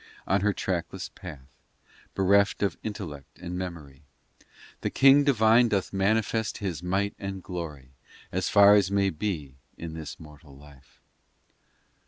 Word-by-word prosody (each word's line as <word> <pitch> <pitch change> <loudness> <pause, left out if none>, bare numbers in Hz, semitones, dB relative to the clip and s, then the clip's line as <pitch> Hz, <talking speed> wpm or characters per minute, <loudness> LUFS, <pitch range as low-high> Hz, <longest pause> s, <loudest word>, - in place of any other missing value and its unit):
XI - - -22
On 95 +1 +3
her 105 +1 +2
trackless 95 0 -3
path, 75 -9 -10 0.7
Bereft 100 +2 +3
of 100 - 0
intellect 90 -10 -7
and 90 0 -6
memory, 85 -7 -7 0.8
The - - -2
King 135 +1 +6
divine 120 -3 +4
Doth 100 -2 -1
manifest 110 +3 0
His 90 -6 -4
might 95 +3 -1
and 95 -2 -6
glory, 75 -8 -7 0.4
As 95 +1 -1
far 100 0 +7
as 100 -3 +4
may 100 -1 +1
be 75 -7 -4 0.2
in 85 -1 -7
this 80 -1 -8
mortal 75 -3 -14
life. 70 -2 -18
95 Hz, 140 wpm, -27 LUFS, 80-100 Hz, 0.8 s, far